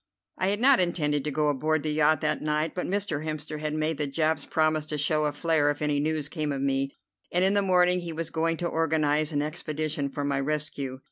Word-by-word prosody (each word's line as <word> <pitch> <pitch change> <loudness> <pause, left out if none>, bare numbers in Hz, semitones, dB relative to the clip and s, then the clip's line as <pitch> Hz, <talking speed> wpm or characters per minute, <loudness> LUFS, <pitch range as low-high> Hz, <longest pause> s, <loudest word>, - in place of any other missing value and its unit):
I 185 - +1
had 205 +2 0
not 265 +2 +5
intended 150 -5 0
to - - 0
go 150 +1 +1
aboard 155 +2 0
the 155 - -1
yacht 155 +1 +3
that 150 -2 0
night, 150 +1 -1
but 180 - -3
Mr. 190 -6 -1
Hemster 155 -1 -5
had 155 0 -3
made 155 -1 -1
the 150 - 0
Japs 155 +1 0
promise 155 -1 +1
to 150 - -3
show 150 +1 +1
a 150 - +1
flare 150 0 +1
if 145 - -2
any 150 -1 0
news 155 0 0
came 150 -1 -3
of 140 - -2
me, 135 0 -1 0.4
and 180 +1 +2
in 195 - +3
the 205 - +3
morning 180 -1 +3
he 175 -1 -6
was 165 0 -4
going 165 0 0
to 175 - -2
organize 155 -2 +1
an 145 -1 0
expedition 155 -2 -3
for 145 +1 -4
my 140 -1 0
rescue. 140 -2 -1
155 Hz, 230 wpm, -27 LUFS, 145-165 Hz, 0.4 s, not